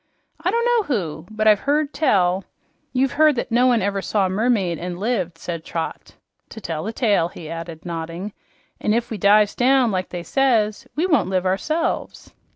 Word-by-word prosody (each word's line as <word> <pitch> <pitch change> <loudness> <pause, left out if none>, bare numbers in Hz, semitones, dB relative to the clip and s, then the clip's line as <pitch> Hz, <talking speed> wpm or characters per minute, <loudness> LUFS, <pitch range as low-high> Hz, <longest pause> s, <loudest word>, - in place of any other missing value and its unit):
"I - - +2
don't 470 0 +1
know 485 -1 +3
who, 170 - -3
but 215 0 -1
I've 210 -2 +6
heard 295 +1 0
tell 190 - +2 0.2
" - - -44
"You've 260 0 +1
heard 305 -1 +4
that 240 - -3
no 245 +2 +4
one 240 -4 +3
ever 200 0 -1
saw 200 0 +1
a - - -1
mermaid 195 -4 +1
and 175 0 -5
lived," 190 -6 -1
said 170 -1 -5
Trot. 165 0 -5 0.3
"To 225 - -9
tell 165 -6 -4
the 220 - -3
tale," 205 -8 +2
he 170 -2 -10
added, 165 0 -7
nodding. 170 +4 -5 0.5
"An' 215 - +1
if 235 0 -2
we 215 - -4
dives 205 +2 +4
down 255 -1 +3
like 185 -1 -2
they 175 -1 -5
says, 225 -4 +1
we 320 +5 +1
won't 310 - +2
live 185 -1 0
ourselves." 310 - -2
210 Hz, 195 wpm, -22 LUFS, 180-250 Hz, 0.5 s, I've